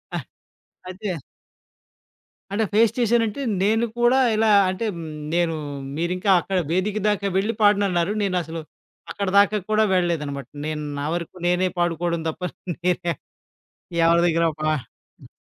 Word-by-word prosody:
అహ్, - - -4 0.6
అయితే 190 +2 -5 1.4
అంటే 210 +3 +1
ఫేస్ 225 +1 +5
చేశానంటే 235 +1 +1 0.2
నేను 220 +4 +3
కూడా 240 +2 +4 0.2
ఇలా 220 0 +3 0.2
అంటే 185 +5 -3
హ్మ్, 165 -1 -6 0.3
నేను 170 -2 +1 0.4
మీరింకా 180 +4 0
అక్కడ 190 +2 -2
వేదిక 190 +4 0
దాకా 200 -1 0
వెళ్ళి 210 +4 +1
పాడనన్నారు 200 -3 +3
నేనసలు 175 -4 -2 0.5
అక్కడిదాకా 200 +1 +3
కూడా 215 0 +3
వెళ్ళలేదనమాట. 150 -7 -1 0.2
నేను 155 -1 -3 0.2
నా 145 - -3
వరకు 170 +1 -4
నేనే 180 +1 +2
పాడుకోవడం 170 0 0
దప్ప 160 +3 -4 0.4
నేనే 180 -1 0 0.9
ఎవరి 170 +1 +5
దగ్గరో 165 0 +2
పా 155 - +1
హ్మ్. - - -19
185 Hz, 125 wpm, -23 LUFS, 170-210 Hz, 1.4 s, ఫేస్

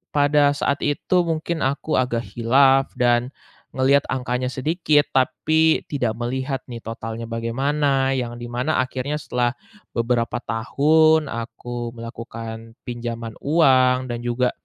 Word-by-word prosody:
pada 145 0 +4
saat 140 0 0
itu 145 +5 +1
mungkin 165 0 -2
aku 140 +3 -1
agak 120 -2 0
khilaf, 135 +3 +4
dan 120 0 +2 0.5
ngelihat 135 +2 +4
angkanya 125 -1 -1
sedikit, 150 +2 +1
tapi 155 +5 +2
tidak 125 -6 -1
melihat 130 +3 -3
nih 115 - -6
totalnya 115 0 -6
bagaimana. 135 +4 0
Yang 120 -2 -3
di 120 - -5
mana 125 +6 0
akhirnya 130 +3 -3
setelah 120 -3 -1 0.4
beberapa 120 0 0
tahun, 155 +7 +3
aku 120 +1 -6
melakukan 115 0 -8
pinjaman 115 -2 -5
uang, 130 -4 +4
dan 120 - -3
juga, 125 +1 +1
130 Hz, 125 wpm, -22 LUFS, 120-145 Hz, 0.5 s, pada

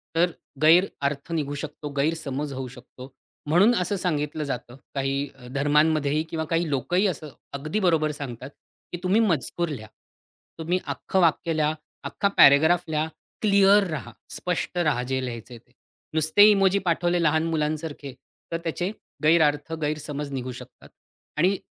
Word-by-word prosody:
तर 175 +2 +3 0.3
गैर 165 +4 +6 0.2
अर्थ 140 +3 -5
निघू 145 -3 -2
शकतो, 150 0 -6
गैरसमज 145 -1 -1
होऊ 130 -1 -5
शकतो 125 +1 -13 0.3
म्हणून 185 +10 +5
असं 180 +3 -1
सांगितलं 155 -4 -2
जातं. 125 -3 -5 0.2
काही 135 +1 -1 0.3
धर्मांमध्येही 150 +1 +2
किंवा 160 -1 -3
काही 165 -1 0
लोकंही 150 - +1
असं 155 -4 -4 0.2
अगदी 150 +8 -2
बरोबर 165 -6 +2
सांगतात, 135 -3 -7 0.4
की 175 - -4
तुम्ही 190 +4 +3
मजकूर 170 - 0
लिहा. 110 -8 -6 0.7
तुम्ही 170 +3 0
अख्खं 190 - -2
वाक्य 165 0 +2
लिहा. 155 0 +2 0.3
अख्खा 200 - -1
पॅराग्राफ 160 +5 +6
लिहा. 155 0 0 0.3
क्लिअर 200 -1 +5
राहा. 125 -6 -5 0.2
स्पष्ट 180 0 -3
राहा, 150 -8 +1
जे 130 +1 -2
लिहायचंय 120 0 -7
ते. 120 +2 -24 0.4
नुसते 160 +7 +6
इमोजी 195 -1 +3
पाठवले 175 +1 +1
लहान 160 0 +3
मुलांसारखे, 150 -3 -3 0.4
तर 165 - 0
त्याचे 175 +3 -2 0.3
गैरअर्थ, 150 -1 +3
गैरसमज 150 -1 -3
निघू 130 -1 -4
शकतात 125 0 -12 0.5
आणि 185 +5 +3
155 Hz, 140 wpm, -25 LUFS, 140-175 Hz, 0.7 s, गैर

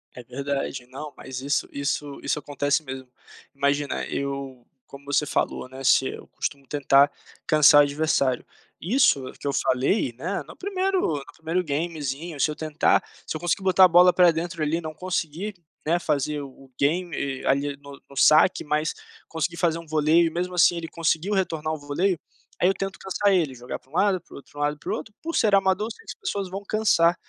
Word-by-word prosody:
É 125 - -9
verdade, 135 -1 -4
não 145 +3 -8
mas 130 -1 -7
isso 140 +2 0
isso 140 0 -3
isso 150 - 0
acontece 145 +1 0
mesmo. 130 -2 -7 0.5
Imagina, 140 +1 0
eu 135 -3 -4 0.2
como 140 0 -13
você 145 +1 +1
falou, - - -1
né, 130 +1 -9
se 130 +1 +4
eu - - -7
costumo 140 -1 -4
tentar 140 -1 +4 0.3
cansar 150 -2 +7
o - - +6
adversário. 140 -3 +1 0.4
Isso 170 - +2
que - - -12
eu 140 - 0
falei, 130 - +1
né, 180 +8 -3
no - - -11
1º 385 -1 -1 0.2
no 135 - -10
1º 165 +3 -1
gamezinho 150 0 -3
se 155 - +3
eu 150 - -4
tentar 155 -1 +2 0.2
se - - -3
eu - - -11
conseguir 175 +2 0
botar 190 -1 +5
a 185 - +10
bola 180 +1 +7
para 180 -1 +5
dentro 165 0 -3
ali 155 +2 +1
e - - -4
não 155 -1 -7
conseguir, 180 +2 -3 0.3
né, 170 +3 +2
fazer 150 -1 -1
o-o 135 -1 -12
game 145 -3 -1
ali 140 +1 +1
no 140 -1 -13
no 140 - -13
saque, 155 +6 +5
mas 150 +1 -1 0.3
conseguir 165 +1 -3
fazer 165 -2 +1
um 165 - -9
voleio 155 +2 +3
e 165 - +1
mesmo 180 +2 -3
assim 175 0 +5
ele 165 -1 -4
conseguiu 165 +4 0
retornar 160 -4 -1
o 155 - -2
voleio, 155 +5 -1 0.4
aí 180 - +4
eu 195 - +3
tento 195 0 -4
cansar 200 +1 0
ele, 165 -8 +2
jogar 125 0 -6
para 130 - -29
um - - -24
lado, 190 +1 +2
para - - -19
o - - -9
outro 145 +1 -15
lado 145 0 0
e - - -25
para - - -5
o - - +1
outro, 215 - -8
por 330 +2 -4
ser 210 -3 +3
amador 195 +3 +2
sei - - -11
que - - -8
as - - -80
pessoas 200 - -3
vão 195 +2 -6
cansar, 180 -6 +3
155 Hz, 205 wpm, -25 LUFS, 140-180 Hz, 0.5 s, a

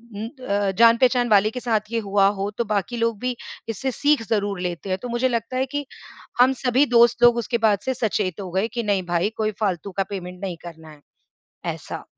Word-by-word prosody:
उम, 215 +2 -4 0.2
अ, 200 -1 +1
जान-पहचान 240 +2 +5
वाले 210 0 +5
के 250 - -5
साथ 220 -3 -1
ये 230 - 0
हुआ 200 -2 +2
हो, 200 +1 -1
तो 235 - +1
बाकी 210 +3 -2
लोग 230 -2 0
भी 250 +1 -2 0.3
इससे 245 +5 -2
सीख 290 0 +2
ज़रूर 205 -3 0
लेते 180 +1 -4
हैं। 185 - 0
तो 245 - -5
मुझे 240 +2 +1
लगता 235 +1 -2
है 260 - +1
कि 290 0 -2 0.6
हम 260 +2 +5
सभी 255 +3 +4
दोस्त 235 0 +5
लोग 240 0 +7
उसके 235 0 -1
बाद 205 -2 +2
से 260 - 0
सचेत 205 -6 -1
हो 185 -2 -7
गए 190 +5 0
कि 235 0 -4
नहीं 200 -3 0
भाई, 175 +3 +1
कोई 215 -1 0
फ़ालतू 195 -2 -1
का 195 - +2
पेमेंट 180 -2 -7
नहीं 185 -3 -4
करना 160 -2 -10
है, 150 -1 -15 0.7
ऐसा। - - -8
215 Hz, 215 wpm, -23 LUFS, 195-240 Hz, 0.7 s, लोग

